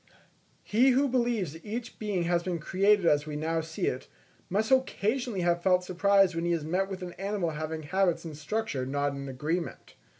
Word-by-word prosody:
He 240 +6 +4
who 265 +2 +3
believes 235 - 0
that 165 - -12
each 230 +3 -6
being 205 -5 -1
has 170 0 +1
been 175 -1 -2
created 195 +4 +2
as 150 -2 +3
we 150 - -4
now 160 +2 -1
see 160 0 -4
it, 130 - -2 0.4
must 215 +6 0
occasionally 245 -4 +1
have 175 0 +1
felt 180 0 +3
surprise 195 +1 +3
when 165 - -1
he 175 - +2
has 160 -3 -2
met 185 +4 0
with 190 -1 -5
an 175 -1 -6
animal 195 -4 -1
having 155 +1 -4
habits 180 +2 +1
and 160 -2 -6
structure 155 -2 -2
not 140 +2 -1
in 140 0 -6
agreement. 155 +7 -3
180 Hz, 195 wpm, -29 LUFS, 160-205 Hz, 0.4 s, He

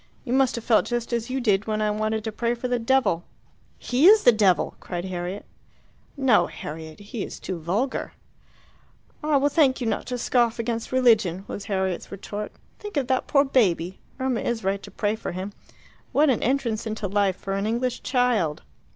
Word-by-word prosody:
"You 245 - -3
must 265 -1 +3
have 235 - -5
felt 225 -2 +3
just 240 0 -2
as 235 +1 -1
you 265 +1 -1
did 210 -4 +1
when 215 0 -1
I 215 0 +1
wanted 215 +1 -1
to 220 - -3
pray 235 +2 -1
for 240 +1 -4
the 245 -1 0
devil." 230 -8 +2 0.5
"He 260 +7 +3
is 425 +1 +7
the 245 - +8
devil," 205 -5 +2
cried 175 0 -5
Harriet. 185 +1 -4 0.7
"No, 265 -5 +4
Harriet; 160 +2 -8
he 205 +1 -5
is - - -7
too 185 -3 -5
vulgar." 200 - -2 1.1
"I 300 -1 +3
will 280 +1 +3
thank 285 -3 +3
you 245 - -3
not 225 - -1
to 250 - -2
scoff 240 -1 +2
against 230 -1 -3
religion!" 220 -8 +3
was 200 - -6
Harriet's 190 -3 -2
retort. 205 +1 -6 0.3
"Think 415 -6 -6
of 275 - +1
that 260 -1 +1
poor 280 -2 +4
baby. 190 -9 +1 0.2
Irma 260 -3 0
is 235 -3 -2
right 195 +1 0
to - - -10
pray 210 +1 -1
for 220 - -5
him. 190 +3 -5 0.6
What 295 -1 +4
an 235 - 0
entrance 235 -4 0
into 215 -1 -3
life 200 -1 +1
for 195 - -5
an 195 +2 -1
English 245 +2 -1
child!" 245 - +1
225 Hz, 195 wpm, -25 LUFS, 195-255 Hz, 1.1 s, the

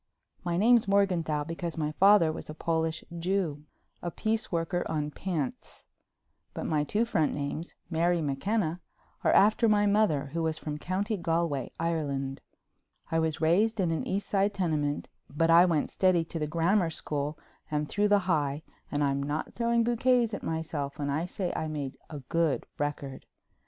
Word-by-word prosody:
My 175 -1 -1
name's 230 +2 +5
Morganthau 180 -7 +2
because 165 +1 -5
my 150 -1 -1
father 190 -1 +5
was 155 - -8
a 155 - -6
Polish 160 0 -1 0.2
Jew—a 170 -2 -3
piece 220 +5 -1
worker 175 +1 0
on 150 -2 -1
pants—but 160 -6 -7
my 150 -2 +1
two 210 +9 +1
front 160 -9 +1
names, 145 +4 -4
Mary 170 +1 +1
McKenna, 165 +4 -1 0.4
are - - +4
after 215 +3 +5
my 205 -1 +4
mother, 200 -10 +2
who 165 - -1
was 160 -1 0
from 150 -1 -5
County 200 +6 -1
Galway, 165 -6 -1
Ireland. 140 -5 -2 0.7
I 165 - +2
was 160 -1 -1
raised 205 +8 +3
in 175 -3 +2
an 160 - -2
East 195 +2 -2
Side 200 0 +1
tenement, 150 -6 -1 0.2
but 165 +4 +2
I 170 +2 +8
went 165 -5 0
steady 185 -3 +3
to 165 - -5
the 150 - -1
Grammar 170 +4 +2
school 150 -1 -2 0.3
and 150 0 -1
through 210 +5 +1
the 205 -2 +3
High 150 -3 0 0.3
and 145 0 0
I'm 140 0 +1
not 145 +2 -3
throwing 235 0 +2
bouquets 240 0 +2
at - - -3
myself 160 -3 -3
when 145 -1 -2
I 160 +5 -1
say 180 0 -3
I 160 - -2
made 145 -3 -4
a 150 -3 -7
good 165 +2 0
record. 145 -2 -4
165 Hz, 165 wpm, -29 LUFS, 150-195 Hz, 0.7 s, I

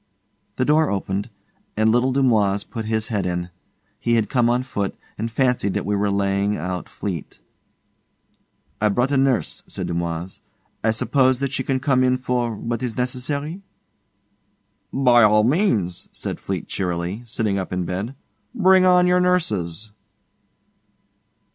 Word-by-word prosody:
The 130 - 0
door 155 +2 +3
opened, 100 +2 -2 0.5
and 110 0 +4
little 120 +3 +2
Dumoise 110 -7 +2
put 110 -1 -6
his 110 +1 -1
head 100 -5 -1
in. 90 0 -3 0.5
He 120 0 +1
had 110 0 0
come 120 -3 +3
on 125 +1 +1
foot, 100 -6 -3 0.2
and 115 +2 -3
fancied 120 -5 +1
that - - -1
we 105 +1 0
were 100 0 +1
laving 100 +1 0
out 90 +2 -4
Fleete. 90 -7 -6 1.4
'I've 105 -1 +2
brought 125 +3 +1
a 140 - +2
nurse,' 135 -3 +1
said - - -5
Dumoise. 85 +1 -4 0.4
'I 110 - +3
suppose 130 +3 +2
that 140 -1 -1
she 135 - -1
can 130 0 -1
come 130 -1 +2
in 130 0 +3
for... 125 -3 -1
what 115 +2 -3
is 120 -4 -4
necessary.' 140 +7 -3 1.3
'By 125 -3 +5
all 105 0 +5
means,' 115 - +1
said - - -5
Fleete - - -4
cheerily, 90 +3 -3
sitting 110 -4 -1
up 95 - -5
in 90 -1 -1
bed. 100 +9 -4 0.4
'Bring 190 -4 +5
on 180 -1 +5
your 180 0 +4
nurses. 110 - 0
115 Hz, 150 wpm, -22 LUFS, 100-130 Hz, 1.4 s, By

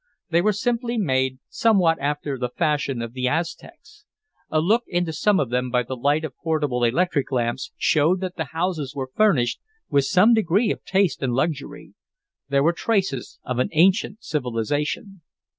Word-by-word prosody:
They 170 +1 +4
were 215 +4 +3
simply 235 +3 -1
made, 130 - 0
somewhat 185 -8 +2
after 145 0 -2
the 125 -1 -3
fashion 140 -5 -1
of 115 0 -7
the 130 0 -1
Aztecs. 170 - -5 0.5
A 155 - +1
look 215 +9 +2
into 175 -2 -1
some 195 +5 +2
of 130 -4 -1
them 125 0 0
by 125 0 +1
the 130 +2 -5
light 145 +5 +1
of 150 - -8
portable 150 -7 -1
electric 145 +4 +1
lamps 120 +1 -1
showed 160 +5 +2
that 185 -1 -4
the 160 - -3
houses 160 -2 -3
were 130 -2 -4
furnished 155 - +2 0.3
with 140 -1 +3
some 185 - +5
degree 215 +1 +2
of - - -5
taste 190 -6 +1
and 130 -3 0
luxury. 145 +1 -3 0.6
There 140 0 +2
were 165 +3 +3
traces 190 - -1
of 125 -1 -3
an 125 - +1
ancient 195 +6 +2
civilization. 145 - -2
155 Hz, 170 wpm, -23 LUFS, 130-185 Hz, 0.6 s, some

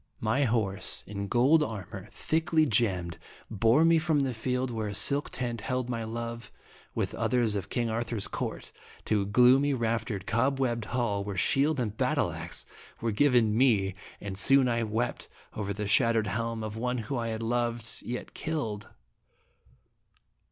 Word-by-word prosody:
My 115 +6 +1
horse, 110 -4 -1
in 100 -1 -5
gold 130 +9 +4
armor, 110 -10 -5
thickly 160 0 +1
gemmed, 95 - +1 0.3
bore 115 +9 +4
me 165 0 +5
from 155 -3 +1
the 135 -2 -1
field 125 +2 -2
where 110 -2 -3
a 100 - -4
silk 140 +7 +2
tent 120 -3 -3
held 125 +2 -2
my 115 -1 -2
love, 115 0 -5 0.4
with - - -1
others 120 -4 +1
of 100 -2 -3
King 120 -2 -1
Ar 115 +1 -1
thur's 115 -3 -2
court, - - -5 0.3
to 105 -2 +1
a - - -2
gloomy 130 +6 +5
raftered 115 -4 -2
cobwebbed 120 -1 0
hall, 115 -5 -1
where 100 -1 -5
shield 140 - +2
and 110 -4 -2
battle - - +1
axe - - -5 0.3
were 115 - -1
given 115 -2 +3
me, 110 -6 +3 0.3
and 100 -1 -5
soon 135 +4 +5
I 115 -1 +1
wept 115 +2 -2 0.2
over 100 -2 -3
the 105 +1 -3
shattered 115 0 +3
helm 115 +2 -2
of 110 -1 -5
one 125 +2 -1
whom 120 +3 -3
I 115 - -2
had 110 0 -3
loved 120 -1 -1
yet 125 +1 -5
killed. 115 -11 -4
115 Hz, 165 wpm, -29 LUFS, 105-125 Hz, 0.4 s, me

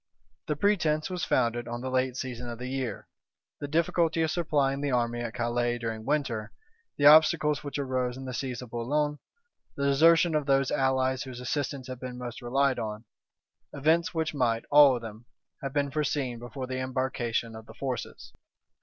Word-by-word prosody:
The 150 - 0
pretence 160 -3 +1
was 180 -2 -3
founded 120 0 +1
on 120 0 -5
the 130 0 -4
late 130 0 0
season 125 -2 -5
of 120 - -6
the 125 - -6
year, 130 -2 -4 0.5
the 145 - -4
difficulty 165 +1 +1
of 160 - 0
supplying 145 -5 0
the 145 - -1
army 120 -2 0
at 120 0 -5
Calais 120 0 0
during 115 -2 -5
winter, 120 -7 -1 0.5
the 145 - +1
obstacles 155 -1 +6
which 145 0 -4
arose 130 -2 -1
in 135 - -7
the 130 - -5
siege 125 -1 -4
of 120 - -12
Boulogne, 145 +5 -1 0.6
the 140 - -3
desertion 165 +4 +5
of 150 -2 0
those 135 -1 +2
allies 130 0 +1
whose 130 -3 -7
assistance 135 +1 -3
had 130 -1 -7
been 125 -1 -6
most 125 -1 -7
relied 135 +2 +1
on: 110 +1 -5 0.7
events 160 +4 +2
which 160 -2 -2
might, 120 -5 0
all 145 -2 +8
of 120 - -6
them, 110 +1 -9 0.4
have 135 - -4
been 140 0 0
foreseen 140 -5 -1
before 120 +2 -6
the 130 0 -4
embarkation 130 -3 -2
of 110 0 -11
the - - -13
forces. 120 -4 -5
130 Hz, 180 wpm, -28 LUFS, 120-145 Hz, 0.7 s, all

